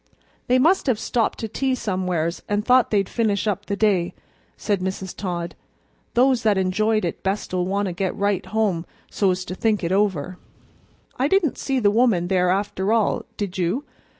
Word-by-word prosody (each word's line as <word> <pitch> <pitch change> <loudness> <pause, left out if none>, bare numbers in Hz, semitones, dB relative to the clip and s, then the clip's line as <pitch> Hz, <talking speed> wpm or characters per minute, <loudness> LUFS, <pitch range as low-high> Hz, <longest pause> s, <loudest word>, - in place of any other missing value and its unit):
"They 250 - +4
must 325 +6 +3
have 250 -5 +2
stopped 230 +1 0
to 225 - -2
tea 260 +4 -1
somewheres 180 -6 -2
and 205 +1 0
thought 255 -1 +4
they'd 200 -3 +1
finish 215 -4 0
up 205 -1 -2
the 200 - -1
day," 190 -4 +1 0.4
said 205 -3 0
Mrs. 190 0 -4
Todd. 175 -3 -4 0.6
"Those 255 0 +4
that 215 -3 +2
enjoyed 215 +3 +1
it 170 - -4
best'll 190 -2 -1
want 200 +2 0
to 185 - -3
get 185 +1 -2
right 200 -1 0
home 195 -5 0 0.2
so's 185 -2 +1
to - - -5
think 210 +1 0
it 170 - -1
over." 185 -4 0 0.8
"I 265 - +2
didn't 350 -4 +1
see 270 -1 -1
the 205 -5 +3
woman 210 -6 +2
there 180 -1 +2
after 195 +1 0
all, 225 -2 +1
did 200 -2 -4
you?" 185 +12 0
200 Hz, 180 wpm, -23 LUFS, 185-225 Hz, 0.8 s, They